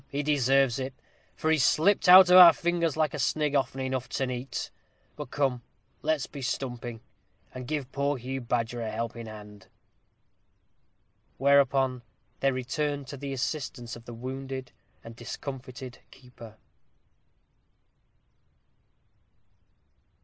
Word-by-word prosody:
he 145 +1 -3
deserves 135 -3 +2
it, 130 0 -5 0.4
for 160 - 0
he's 155 -4 +3
slipped 180 +7 +3
out 185 0 +9
of - - +8
our 175 -2 +11
fingers 170 -3 -1
like 155 -1 +1
a 150 - -4
snig 150 +2 0
often 135 -1 0
enough 130 -1 -3
to 135 - -1
night. 125 +1 -5 0.4
But 150 -4 -7
come, 135 -4 -1 0.4
let's 155 -2 0
be 140 - -10
stumping, 120 -3 -4 0.5
and 125 -1 -8
give 140 -3 -3
poor 140 +1 -1
Hugh 130 +2 -5
Badger 120 0 -2
a 110 - -3
helping 115 +1 -5
hand." 105 -2 -12 1.7
Whereupon 135 -2 +3 0.4
they 135 - +2
returned 140 +3 -3
to 140 - -7
the 140 +1 -6
assistance 130 -3 -4
of 115 0 -13
the 120 - -9
wounded 130 +1 -6 0.3
and 115 0 -11
discomfited 130 +1 -8
keeper. 120 -4 -14
130 Hz, 125 wpm, -28 LUFS, 120-145 Hz, 1.7 s, our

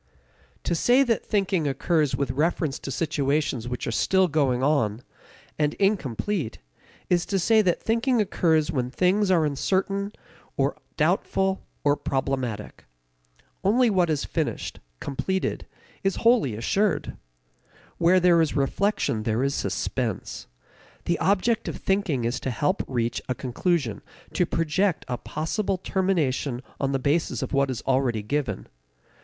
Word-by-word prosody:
To - - 0
say 245 +10 +4
that 235 -4 0
thinking 190 -6 0
occurs 150 +2 +1
with 140 -2 -1
reference 150 +1 0
to - - -7
situations 145 -4 0
which 125 0 -4
are - - -2
still 190 +10 +3
going 135 -5 +1
on, 130 -6 +1 0.6
and 150 -1 +1
incomplete, 195 - -1 0.5
is 175 -1 +2
to 195 - 0
say 220 +4 +4
that 180 -4 +1
thinking 235 +2 +2
occurs 165 -6 +2
when 125 -5 -1
things 185 +7 +2
are 170 -4 +4
uncertain 195 +7 0 0.5
or - - +1 0.2
doubtful 190 0 +1 0.2
or 145 0 +4
problematic. 130 -7 -3 0.8
Only 230 +4 +4
what 180 -4 +2
is 150 -3 0
finished, - - -3 0.2
completed, 190 +7 -2 0.4
is 195 0 +1
wholly 230 - +4
assured. 195 - 0 0.8
Where 175 +2 +5
there 175 -2 +5
is 160 -3 0
reflection 140 - 0
there 110 +3 0
is 140 0 +1
suspense. - - -3 0.6
The 170 - 0
object 205 +4 +1
of - - -4
thinking 175 -11 0
is 120 +2 -1
to - - -3
help 150 - 0
reach 120 -2 -1
a 125 - 0
conclusion, 130 - -1 0.3
to 180 - +1
project 165 +4 0
a 125 -2 -3
possible 185 +5 -2
termination 155 -10 0 0.2
on 135 -1 0
the 135 - +1
basis 145 +5 0
of - - -5
what 140 0 +2
is 125 -4 -4
already 130 -5 +1
given. 145 +5 -2
155 Hz, 140 wpm, -25 LUFS, 135-190 Hz, 0.8 s, Where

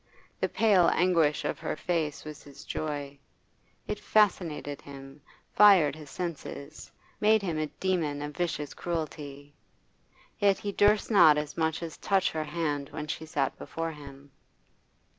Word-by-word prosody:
The - - 0
pale 200 -6 +4
anguish 165 -4 +2
of - - -2
her - - -3
face 155 -3 -2
was 155 -1 -8
his 140 -1 -13
joy; 145 -2 -4 0.7
it - - -4
fascinated 170 -9 +1
him, 135 0 -11 0.3
fired 190 -9 +6
his 150 -2 -11
senses, 155 -3 -6 0.3
made 215 0 +4
him 165 -5 -2
a 155 - -1
demon 155 -5 -2
of 150 0 -6
vicious 165 -4 -2
cruelty. 145 -4 -5 0.9
Yet 200 -2 +4
he 205 - -4
durst 205 +2 +3
not 155 -8 +7
as 150 0 -3
much 160 0 -1
as 165 -2 -7
touch 195 -1 +1
her 155 -1 -3
hand 150 -3 -2
when 150 - -5
she 160 +1 -5
sat 140 -3 -1
before 165 0 -4
him. 140 -2 -12
155 Hz, 145 wpm, -28 LUFS, 145-180 Hz, 0.9 s, not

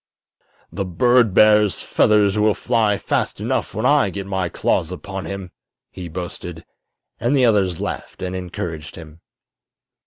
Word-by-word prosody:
"The 100 - -3
bird 115 +5 +3
bear's 105 0 +4
feathers 105 -1 +3
will 105 -1 +3
fly 110 -1 +1
fast - - -2
enough - - -2
when - - -2
I - - +4
get 100 -1 -6
my 95 -2 -2
claws 85 +1 0
upon 95 +1 -6
him!" 95 -2 -6 0.4
he 90 -2 -8
boasted; 85 -1 -7 0.5
and 125 +5 +1
the 130 - +4
others 95 -7 +2
laughed - - -5
and 90 0 -3
encouraged 85 -4 -6
him. 80 0 -12
95 Hz, 145 wpm, -21 LUFS, 90-105 Hz, 0.5 s, bear's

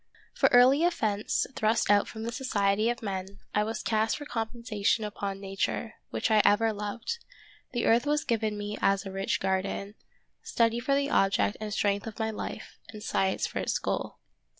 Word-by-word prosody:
For - - +3
early 255 +5 +6
offence 215 -12 +1
thrust 220 -1 +2
out 205 0 +4
from 220 - -7
the 230 - -3
society 215 -3 +1
of 240 0 -3
men, 195 -1 -4 0.2
I 210 - +3
was 220 +1 -4
cast 220 0 +1
for 295 - -8
compensation 225 -3 -1
upon 200 -2 -4
Nature, 195 0 -2 0.2
which - - -1
I 215 -1 +6
ever 220 +2 +4
loved; 210 - -4 0.5
the 240 - -1
earth 235 +4 +3
was 295 0 +2
given 220 -2 0
me 205 0 -4
as 195 +1 +2
a 195 - -5
rich 195 0 -1
garden, 195 +1 -1 0.5
study 230 0 +1
for 275 +3 +1
the 280 +1 0
object 195 +1 +2
and 215 -1 -4
strength 205 0 0
of 220 - -7
my 220 -1 -1
life, 215 - -7
and 215 -1 -9
science 190 -3 0
for - - -4
its - - 0
goal. - - -3
215 Hz, 180 wpm, -28 LUFS, 200-235 Hz, 0.5 s, early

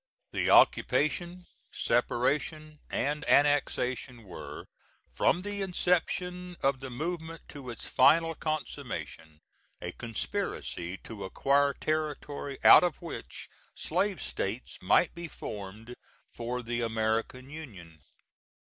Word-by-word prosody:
The - - 0
occupation, 175 +3 +3 0.3
separation 150 +6 0
and 150 +2 -1
annexation 130 -4 +2
were, 95 -4 -8 0.5
from 180 - +2
the 205 0 -3
inception 180 -1 0
of 135 -1 +2
the 130 0 -6
movement 165 +4 -5
to 140 -4 -8
its 120 - -6
final 165 +5 +5
consummation, 80 - -5 0.4
a 90 - -4
conspiracy 95 -4 -4
to 110 -3 -7
acquire 140 +8 +2
territory 150 -2 -2
out - - +10
of 175 -2 0
which 170 -2 -7 0.3
slave 190 +4 -1
states - - -4
might - - +4
be 170 -1 -6
formed 105 -2 -7 0.4
for 125 +1 -4
the 120 +1 -2
American 115 +3 -1
Union. 95 - -10
140 Hz, 105 wpm, -30 LUFS, 115-165 Hz, 0.5 s, out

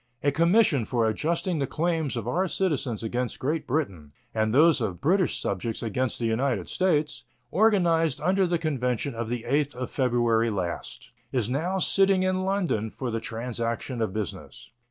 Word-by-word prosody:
A 145 - +3
commission 170 - +3
for 115 -1 +1
adjusting 165 - -1
the 135 - 0
claims 160 -4 -1
of 115 -1 -4
our 180 +9 +1
citizens 145 - -1
against 120 +1 -2
Great 155 +5 -2
Britain 95 - -2 0.2
and 110 -1 +1
those 150 +2 +5
of 95 -6 -2
British 185 +4 +2
subjects 110 +5 -3
against 120 +2 -1
the 120 - -2
United 115 -3 0
States, 155 -5 0 0.3
organized 170 - +3
under 190 0 +2
the 175 0 +1
convention 135 -5 -1
of 115 -1 -4
the 120 -1 -3
8th 145 +2 +1
of 125 0 -5
February 120 -3 +2
last, 100 +7 -4 0.2
is 125 -3 0
now 170 +8 -1
sitting 195 0 +3
in 185 0 0
London 180 - 0
for 125 +2 -5
the 115 - -1
transaction 115 +1 -3
of 110 -4 0
business. 105 0 -6
130 Hz, 165 wpm, -26 LUFS, 115-170 Hz, 0.3 s, those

